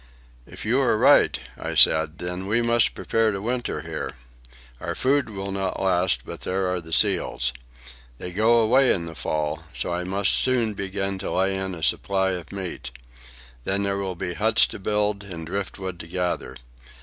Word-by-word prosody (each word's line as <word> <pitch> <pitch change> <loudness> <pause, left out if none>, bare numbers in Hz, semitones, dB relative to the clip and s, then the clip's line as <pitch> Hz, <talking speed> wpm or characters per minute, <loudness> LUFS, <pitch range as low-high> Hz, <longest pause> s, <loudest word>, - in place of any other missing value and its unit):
"If - - -9
you - - +2
are - - +2
right," - - +5 0.2
I - - -4
said, 80 0 +4
"then 90 +2 -5
we 115 +3 +2
must 115 0 +3
prepare 115 -1 +1
to 100 - -3
winter 120 -6 -2
here. 80 0 -5 0.7
Our 85 +3 -4
food 135 -2 +1
will 100 -2 -5
not 95 -1 -2
last, 90 -8 +2
but - - -8
there 95 0 -1
are 90 - -2
the 80 0 -12
seals. 60 -5 +2 0.6
They 90 - -6
go 115 +5 +4
away 130 +4 +4
in 85 -3 0
the 80 - -7
fall, 75 0 -2
so - - -1
I 90 +1 -2
must 95 +2 +3
soon 120 -4 +2
begin 95 0 -3
to 95 - -4
lay 95 +1 +1
in 95 -1 -3
a 80 - -8
supply 95 +2 +1
of 90 -3 -6
meat. 95 -3 -5 0.7
Then 100 +5 0
there 100 0 0
will 95 -2 -3
be 90 +1 -4
huts 110 +4 +4
to - - -7
build 105 0 0
and 85 -5 -7
driftwood 95 0 -5
to 80 - -8
gather. 90 +1 -2
95 Hz, 185 wpm, -24 LUFS, 90-105 Hz, 0.7 s, right